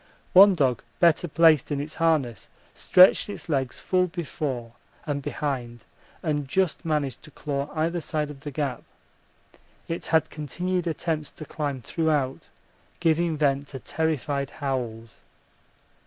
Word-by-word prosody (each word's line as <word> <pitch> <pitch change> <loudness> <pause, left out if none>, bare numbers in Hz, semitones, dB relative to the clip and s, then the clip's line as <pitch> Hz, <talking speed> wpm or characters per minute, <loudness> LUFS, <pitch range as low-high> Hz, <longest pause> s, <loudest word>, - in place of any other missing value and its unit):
One 195 +1 +9
dog 130 -7 +1 0.2
better 170 0 +4
placed 160 -3 +4
in 145 - 0
its 150 +2 -5
harness 150 - 0 0.2
stretched 185 +3 +5
its 205 - -7
legs 135 -5 -1
full 185 -1 +1
before 145 -8 -4 0.3
and 145 -2 -2
behind 125 -5 -4 0.4
and 150 -3 -1
just 185 +4 0
managed 150 -6 -1
to 155 - -14
claw 140 -2 -4
either 165 +2 0
side 150 -2 -2
of 140 - -12
the 145 - -6
gap 140 -2 -3 1.1
it 165 - -4
had 160 -1 +2
continued 175 +4 -2
attempts 160 -2 -2
to 155 - -9
climb 140 -4 -4
throughout, 150 -5 -1 0.5
giving 165 -1 +1
vent 140 -1 +1
to 135 - -8
terrified 145 -1 -2
howls. 125 -6 -4
150 Hz, 135 wpm, -25 LUFS, 135-165 Hz, 1.1 s, One